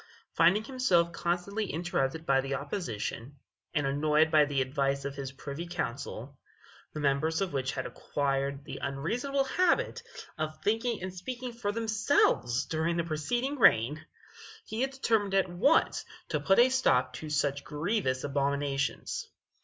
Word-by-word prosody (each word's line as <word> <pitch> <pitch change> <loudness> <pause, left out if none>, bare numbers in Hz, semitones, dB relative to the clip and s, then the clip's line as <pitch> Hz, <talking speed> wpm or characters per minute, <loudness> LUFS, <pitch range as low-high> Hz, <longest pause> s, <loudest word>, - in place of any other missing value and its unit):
Finding 180 +6 +4
himself 220 -10 +2
constantly 180 +5 -2
interrupted 160 -2 -1
by 135 -2 +3
the 135 +1 -2
opposition, 135 - -4 0.4
and 145 - +2
annoyed 150 +3 +2
by 150 -2 +6
the 145 -1 -1
advice 135 +1 0
of 140 - -3
his 135 -1 -5
privy 140 +4 -6
council, 135 -3 -5 0.5
the 155 - -5
members 150 +3 +1
of 190 -4 -2
which 135 -1 -1
had - - -3
acquired 140 0 -2
the - - -7
unreasonable 230 - -1
habit 360 +6 +1 0.4
of 155 0 -3
thinking 225 -1 0
and 185 -1 -4
speaking 245 +6 -6
for 230 -3 -2
themselves 220 - +2
during 165 +2 -1
the 170 - +1
preceding 240 - -2
reign, 145 - +4 0.6
he 225 +4 -2
determined 225 -7 0
at 190 -2 +2
once 275 - +3 0.3
to - - 0
put 195 - +3
a 245 +2 +7
stop 130 - +2
to 155 +4 -7
such 145 -1 0
grievous 150 - -1
abominations. 140 0 -1
155 Hz, 145 wpm, -30 LUFS, 140-205 Hz, 0.6 s, a